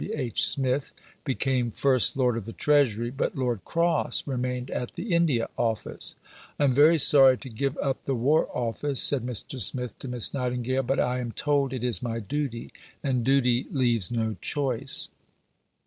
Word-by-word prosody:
W. - - -6
H. 125 -4 +1
Smith 135 0 -1 0.3
became 130 -3 -1
First 130 +2 +1
Lord 125 -3 +2
of 115 -4 -5
the 115 - -8
Treasury, 120 -6 +1
but 135 - -2
Lord 120 -7 -2
Cross 170 0 0
remained 125 -1 -3
at 125 - -4
the 210 -5 -4
India 155 -9 +2
Office. 115 -2 -2 0.4
"I - - 0
am 135 -3 +3
very 150 +5 +5
sorry 135 -3 +7
to 130 - -10
give 135 +5 -3
up 135 -2 -3
the 135 - -1
War 140 +7 +2
Office," 125 +3 -2
said 135 -4 +4
Mr. 125 +1 -2
Smith 125 +3 0
to - - -8
Miss 125 -2 +1
Nightingale, 125 0 -1
"but 135 +1 -1
I 125 +1 0
am 120 -2 -4
told 145 -3 0
it 130 -3 -5
is 125 -1 -1
my 115 -2 -3
duty, 120 +1 -4 0.3
and 130 -4 0
duty 125 -1 +2
leaves 120 - 0
no 110 -2 -2
choice." 135 -3 -1
130 Hz, 175 wpm, -26 LUFS, 120-140 Hz, 0.4 s, sorry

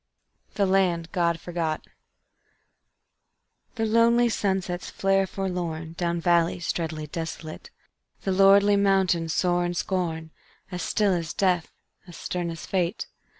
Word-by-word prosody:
The 200 - +2
Land 180 -3 +1
God 170 -3 +1
Forgot 165 -3 -3 1.9
The 225 -2 0
lonely 235 +2 +4
sunsets 190 -4 -2
flare 195 0 +1
forlorn 175 -4 -4
Down 170 0 -1
valleys 170 0 +1
dreadly 160 -2 -4
desolate; 160 0 -7 0.5
The 195 - 0
lordly 200 +2 +5
mountains 190 -4 +2
soar 175 +1 +1
in 175 0 -2
scorn 165 -3 -2 0.4
As 180 -1 -4
still 205 +3 +1
as 170 -3 -2
death, 180 -4 +1 0.4
as 175 - -11
stern 175 -1 -3
as 165 0 -7
fate. 180 -1 -1
175 Hz, 120 wpm, -25 LUFS, 170-195 Hz, 1.9 s, lordly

